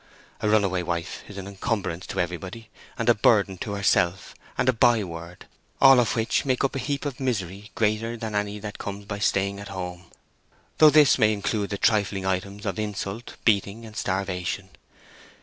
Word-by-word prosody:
A 105 Hz, -, 0 dB
runaway 100 Hz, -4 st, +2 dB
wife 85 Hz, 0 st, -4 dB
is 100 Hz, -, -10 dB
an 95 Hz, 0 st, -6 dB
encumbrance 100 Hz, -3 st, -3 dB
to -, -, -4 dB
everybody, 95 Hz, +6 st, -4 dB, 0.3 s
a 120 Hz, +1 st, +4 dB
burden 100 Hz, -4 st, +3 dB
to 100 Hz, -, -4 dB
herself 95 Hz, -2 st, +1 dB, 0.2 s
and 125 Hz, -, +1 dB
a 130 Hz, -, +5 dB
byword—all 110 Hz, +4 st, +2 dB
of 120 Hz, -, +1 dB
which 115 Hz, 0 st, +1 dB
make 130 Hz, -1 st, 0 dB
up 135 Hz, -, 0 dB
a -, -, -1 dB
heap 140 Hz, +2 st, -2 dB
of 140 Hz, -3 st, -4 dB
misery 105 Hz, -5 st, -3 dB
greater 110 Hz, +2 st, 0 dB
than 110 Hz, -1 st, -5 dB
any 105 Hz, 0 st, -1 dB
that 105 Hz, 0 st, -7 dB
comes 100 Hz, 0 st, -6 dB
by 100 Hz, 0 st, -5 dB
staying 100 Hz, -1 st, +1 dB
at 100 Hz, -, -8 dB
home—though 90 Hz, -, -1 dB
this 150 Hz, -3 st, +6 dB
may 110 Hz, -2 st, +5 dB
include 105 Hz, 0 st, -1 dB
the 100 Hz, -, -3 dB
trifling 100 Hz, -2 st, +1 dB
items 100 Hz, +2 st, -2 dB
of 95 Hz, 0 st, -2 dB
insult, 105 Hz, +1 st, -4 dB
beating, 105 Hz, +1 st, +1 dB
and 110 Hz, -1 st, -12 dB
starvation. 95 Hz, -1 st, -2 dB
100 Hz, 165 wpm, -25 LUFS, 95-115 Hz, 0.3 s, this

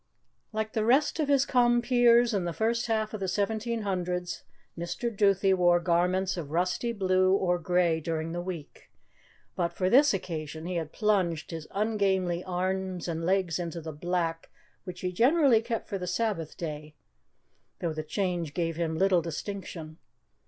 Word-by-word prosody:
Like 220 Hz, 0 st, -3 dB
the 220 Hz, -, 0 dB
rest 270 Hz, +8 st, +3 dB
of 305 Hz, -, +1 dB
his 280 Hz, -1 st, +3 dB
compeers 240 Hz, -1 st, +4 dB
in 195 Hz, -4 st, 0 dB
the 170 Hz, -, -2 dB
first 230 Hz, +5 st, 0 dB
half 220 Hz, -1 st, -1 dB
of 215 Hz, -, -4 dB
the 190 Hz, -, -2 dB
seventeen 220 Hz, +4 st, -1 dB
hundreds, 180 Hz, -2 st, -2 dB, 0.3 s
Mr. 175 Hz, +7 st, -4 dB
Duthie 195 Hz, -1 st, +3 dB
wore 175 Hz, -1 st, +4 dB
garments 180 Hz, +2 st, +1 dB
of 155 Hz, -5 st, -5 dB
rusty 180 Hz, +8 st, 0 dB
blue 185 Hz, -3 st, +2 dB
or 180 Hz, -2 st, +1 dB
grey 175 Hz, -1 st, +2 dB
during 160 Hz, 0 st, -3 dB
the 175 Hz, +1 st, -3 dB
week, 175 Hz, -5 st, -8 dB, 0.7 s
but 170 Hz, -1 st, -1 dB
for 185 Hz, 0 st, 0 dB
this 285 Hz, +4 st, +6 dB
occasion 160 Hz, -4 st, -4 dB
he 180 Hz, 0 st, -2 dB
had 160 Hz, -2 st, -4 dB
plunged 185 Hz, -8 st, 0 dB
his 160 Hz, -2 st, -6 dB
ungainly 195 Hz, -4 st, 0 dB
arms 185 Hz, 0 st, -2 dB
and 165 Hz, -1 st, -3 dB
legs 185 Hz, -3 st, +1 dB
into 170 Hz, -1 st, -4 dB
the 160 Hz, -1 st, -7 dB
black 165 Hz, +1 st, -2 dB, 0.4 s
which 180 Hz, -1 st, -7 dB
he 180 Hz, -, -1 dB
generally 255 Hz, -, +4 dB
kept 230 Hz, 0 st, -4 dB
for 200 Hz, -3 st, -3 dB
the 180 Hz, -, -5 dB
Sabbath 180 Hz, -4 st, -2 dB
day, 150 Hz, -2 st, -6 dB, 0.8 s
though 170 Hz, -2 st, -2 dB
the 155 Hz, -, -3 dB
change 170 Hz, -2 st, -2 dB
gave 165 Hz, -2 st, -1 dB
him 160 Hz, -2 st, -1 dB
little 190 Hz, -1 st, +3 dB
distinction. 165 Hz, -1 st, -6 dB
185 Hz, 165 wpm, -28 LUFS, 170-215 Hz, 0.8 s, this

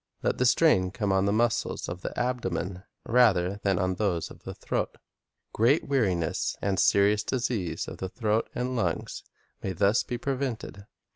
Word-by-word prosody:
Let -, -, 0 dB
the 125 Hz, -, +4 dB
strain 120 Hz, -, +4 dB
come 100 Hz, +1 st, -2 dB
on 95 Hz, 0 st, +2 dB
the 100 Hz, -, +2 dB
muscles 115 Hz, +1 st, 0 dB
of 90 Hz, +1 st, -6 dB
the -, -, -4 dB
abdomen, 95 Hz, -7 st, -2 dB, 0.2 s
rather 100 Hz, -6 st, +3 dB
than 95 Hz, -2 st, +1 dB
on 95 Hz, -1 st, +1 dB
those 90 Hz, -4 st, -1 dB
of -, -, -13 dB
the -, -, -6 dB
throat. -, -, -3 dB, 0.6 s
Great 125 Hz, +8 st, +3 dB
weariness 95 Hz, -, 0 dB
and 95 Hz, -2 st, 0 dB
serious 100 Hz, +3 st, +4 dB
dis 125 Hz, +2 st, -1 dB
ease 95 Hz, -8 st, -3 dB
of -, -, -7 dB
the 95 Hz, -, -4 dB
throat 110 Hz, +1 st, 0 dB
and 125 Hz, +1 st, -2 dB
lungs 90 Hz, -9 st, -2 dB, 0.4 s
may 95 Hz, -, -3 dB
thus 100 Hz, +5 st, +3 dB
be 120 Hz, -, -4 dB
prevented. 125 Hz, -6 st, -4 dB
105 Hz, 170 wpm, -27 LUFS, 95-120 Hz, 0.6 s, the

